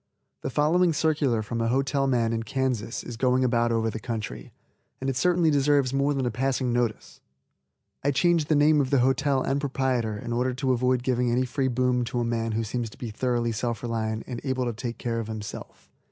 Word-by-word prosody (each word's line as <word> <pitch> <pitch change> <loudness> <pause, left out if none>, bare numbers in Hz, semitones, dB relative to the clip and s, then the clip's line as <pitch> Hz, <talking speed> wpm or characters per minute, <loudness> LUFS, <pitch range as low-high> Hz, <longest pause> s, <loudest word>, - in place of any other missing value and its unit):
The - - -3
following 165 +5 +3
circular 145 -8 +1
from 115 +2 -3
a 115 - +1
hotel 135 +2 +1
man 115 -3 +1
in 115 - -1
Kansas 120 -1 -2
is 120 - -7
going 130 +1 +2
about 120 -1 +2
over 115 -1 +1
the 110 - -5
country, 110 -2 -5 0.5
and 135 +1 -1
it - - -6
certainly 170 +3 +3
deserves 140 -2 +2
more 140 +1 +1
than 135 -2 -1
a 120 - 0
passing 130 +1 0
notice. 120 -3 -2 0.8
I 140 - +2
change 165 +3 +2
the 155 - +2
name 150 +1 +5
of 130 - -1
the 135 -2 +3
hotel 135 +1 +2
and 140 +1 0
proprietor 130 -6 -1
in 120 +2 -5
order 125 +1 0
to 130 0 0
avoid 125 0 +1
giving 125 -1 +1
any 125 +2 +1
free 130 +2 -1
boom 125 0 +1
to 120 - -2
a 120 - 0
man 115 -1 -1
who 115 +1 0
seems 115 +1 -3
to - - -16
be 120 -3 -5
thoroughly 120 +1 0
self 115 +1 -3
reliant 110 -2 -2
and 120 -2 -6
able 130 -2 -1
to 120 - -2
take 120 +1 -5
care 115 -1 -2
of 115 - -4
himself. 105 -2 -8
125 Hz, 215 wpm, -26 LUFS, 115-135 Hz, 0.8 s, name